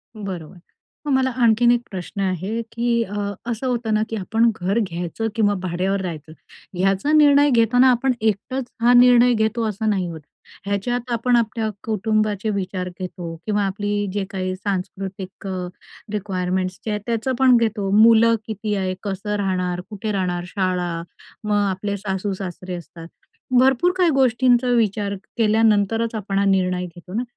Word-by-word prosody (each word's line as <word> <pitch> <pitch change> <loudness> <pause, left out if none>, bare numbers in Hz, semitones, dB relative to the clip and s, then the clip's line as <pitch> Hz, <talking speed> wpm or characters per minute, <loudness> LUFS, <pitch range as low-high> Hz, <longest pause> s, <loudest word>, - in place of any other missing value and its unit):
बरोबर, 185 -5 -7 0.5
मग - - 0
मला 260 0 +2
आणखीन 235 +1 +5
एक 240 -1 +2
प्रश्न 190 +2 -5
आहे, 190 +4 -2
की 235 0 +1
अ, 205 0 -5 0.3
असं 235 +3 -3
होतं 240 -3 -1
ना, 215 0 +2
की 225 - -3
आपण 225 +3 +2
घर 195 +5 +1
घ्यायचं 180 +1 -3
किंवा 210 -3 +3
भाड्यावर 185 +2 -1
राहायचं, 160 -4 -6 0.5
याचा 195 +9 +1
निर्णय 290 -1 +6
घेताना 245 +1 +4
आपण 255 +2 +1
एकटंच 220 +5 -1 0.2
हा 240 +1 +5
निर्णय 245 0 +6
घेतो 220 +1 0
असं 215 +1 -2
नाही 190 -4 0
होतं. 160 -3 -9 0.4
ह्याच्यात 240 +5 -2
आपण 240 +1 +2
आपल्या 225 -1 0
कुटुंबाचे 215 -1 0
विचार 185 -2 -3
घेतो 175 -2 -7
किंवा 210 -1 +1
आपली 205 +1 -2 0.2
जे 205 -1 -1
काही 185 -1 -3
सांस्कृतिक 190 0 -5 0.7
रिक्वायरमेंट्स 185 -2 -2
जे 220 - -1
आहेत, 210 0 -2
त्याचं 235 +2 -1
पण 260 -2 +6
घेतो. 220 -4 0
मुलं 230 +1 +6
किती 215 -1 -3
आहे, 190 -2 -1
कसं 205 +1 -3
राहणार, 180 -3 -1
कुठे 210 0 -4
राहणार, 180 -3 -1
शाळा, 185 -2 -1 0.5
मग 210 -1 0
आपले 200 +2 -3
सासू-सासरे 190 -2 -4
असतात, 170 -1 -10 0.5
भरपूर 265 +7 +4
काही 360 -2 +4
गोष्टींचा 255 -2 +3
विचार 205 -3 0 0.2
केल्यानंतरच 225 0 +2
आपण 200 -2 -3
हा 200 - +2
निर्णय 185 -2 +1
घेतो 175 +1 -12
ना. 230 +4 -1
210 Hz, 150 wpm, -21 LUFS, 185-230 Hz, 0.7 s, निर्णय